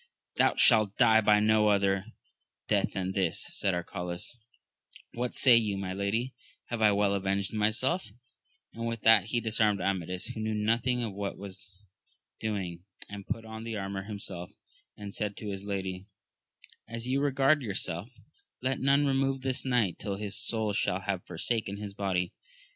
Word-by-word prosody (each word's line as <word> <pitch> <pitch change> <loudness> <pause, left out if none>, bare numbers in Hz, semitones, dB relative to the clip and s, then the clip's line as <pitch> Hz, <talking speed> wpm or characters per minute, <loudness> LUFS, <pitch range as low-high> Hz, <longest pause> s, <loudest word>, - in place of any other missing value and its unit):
Thou - - +4
shalt 105 -3 +5
die 110 -2 +6
by 105 -1 +5
no 105 0 +4
other 100 -1 +2 0.6
death - - +1
than 95 -1 -2
this, 95 -4 0
said 95 -3 0
Arcalaus: 90 +5 -5 0.7
what 120 +1 -3
say 125 -3 +7
you, 105 -4 +2
my 95 -1 -3
lady, 110 +6 -1 0.4
have 120 -2 -3
I 105 -1 +6
well 100 0 +2
avenged 100 0 -1
myself 110 - +1 0.7
1 - - -12
and 115 - -1
with 115 -1 -3
that 110 -4 +6
he 120 +2 0
disarmed 110 -2 +2
Amadis, 90 -2 -2
who - - -6
knew 110 0 -1
nothing 115 +3 +1
of 110 -4 -3
what 100 0 -4
was 95 0 -10 0.6
doing, 95 -5 -3 0.3
and 100 -1 -8
put 115 0 -3
on 110 0 -8
the 115 -1 -4
armour 95 -1 -4
himself, 100 -4 -6 0.5
and 100 -1 -8
said 105 -2 -2
to 105 - -6
his 95 0 -6
lady, 95 -1 -4 0.8
As 115 +1 -6
you 135 +2 +1
regard 140 +1 +3
yourself, 95 -3 -2 0.5
let 130 +1 -1
none 140 +2 +3
remove 135 -1 +1
this 130 -1 0
knight 120 -8 +1
till 100 -2 -3
his 105 0 -3
soul 110 -2 -1
shall 100 -1 0
have 95 -1 -3
forsaken 100 +3 -2
his 100 -1 -6
body. 95 -3 -1
105 Hz, 165 wpm, -29 LUFS, 95-115 Hz, 0.8 s, say